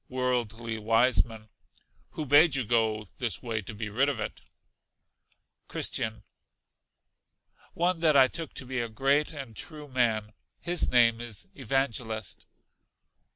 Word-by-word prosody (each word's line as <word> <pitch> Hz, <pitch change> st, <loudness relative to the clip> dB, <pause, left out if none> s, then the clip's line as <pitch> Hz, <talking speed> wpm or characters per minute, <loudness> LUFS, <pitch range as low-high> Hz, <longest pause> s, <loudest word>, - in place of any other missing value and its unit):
Worldly 120 Hz, -3 st, -2 dB
Wiseman. 115 Hz, 0 st, +1 dB, 0.6 s
Who 155 Hz, -, -4 dB
bade 145 Hz, +2 st, +6 dB
you 130 Hz, -3 st, 0 dB
go 110 Hz, -1 st, +1 dB
this 120 Hz, -1 st, -1 dB
way 115 Hz, -3 st, -2 dB
to 110 Hz, +2 st, -8 dB
be 105 Hz, 0 st, -4 dB
rid 130 Hz, +7 st, +1 dB
of 135 Hz, -6 st, -3 dB
it? 105 Hz, -, -5 dB, 1.3 s
Christian. 110 Hz, 0 st, -2 dB, 1.5 s
One 175 Hz, 0 st, +1 dB
that 155 Hz, -3 st, +4 dB
I 130 Hz, -1 st, +7 dB
took 160 Hz, +3 st, -5 dB
to 130 Hz, -, -2 dB
be 130 Hz, 0 st, -3 dB
a 120 Hz, -1 st, -2 dB
great 140 Hz, +7 st, +1 dB
and 135 Hz, -7 st, -8 dB
true 150 Hz, +2 st, -6 dB
man; 115 Hz, -5 st, 0 dB, 0.3 s
his 175 Hz, 0 st, +2 dB
name 115 Hz, -2 st, +4 dB
is 115 Hz, -4 st, -4 dB
Evangelist. 115 Hz, -4 st, -2 dB
120 Hz, 130 wpm, -28 LUFS, 110-140 Hz, 1.5 s, I